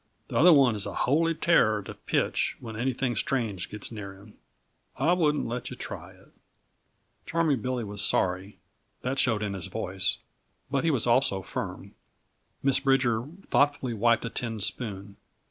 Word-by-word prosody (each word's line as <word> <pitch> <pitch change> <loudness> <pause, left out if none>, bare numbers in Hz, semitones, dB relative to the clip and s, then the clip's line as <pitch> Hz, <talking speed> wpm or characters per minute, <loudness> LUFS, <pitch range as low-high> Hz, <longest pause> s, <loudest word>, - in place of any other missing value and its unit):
The - - -6
other 175 +4 +7
one 135 -6 +6
is 105 -2 -1
a - - -6
holy 165 +5 +2
terror 110 -12 +3
to - - -8
pitch - - -1
when 110 -2 -8
anything 125 +1 -1
strange 105 -6 -1
gets 105 +1 -7
near 100 -3 -7
him. 105 +2 -16 0.6
I 155 +7 +3
wouldn't 150 -4 +1
let 120 +1 -4
yuh - - -7
try - - -7
it." - - -22 1.0
Charming 155 -7 +1
Billy 125 0 -2
was 100 -1 -2
sorry 95 +1 +1 0.5
that 130 +2 -1
showed 110 -4 +2
in 100 -1 -2
his 95 -1 -6
voice 95 -2 -2 0.5
but 140 -1 +1
he 165 - +2
was 135 -8 +2
also 120 -5 +3
firm. - - -6 0.7
Miss 135 -1 +4
Bridger 130 -3 +2 0.2
thoughtfully 140 -4 +1
wiped 115 +2 +2
a 115 - -4
tin 115 -2 -3
spoon. 100 -2 -3
120 Hz, 165 wpm, -27 LUFS, 105-135 Hz, 1.0 s, other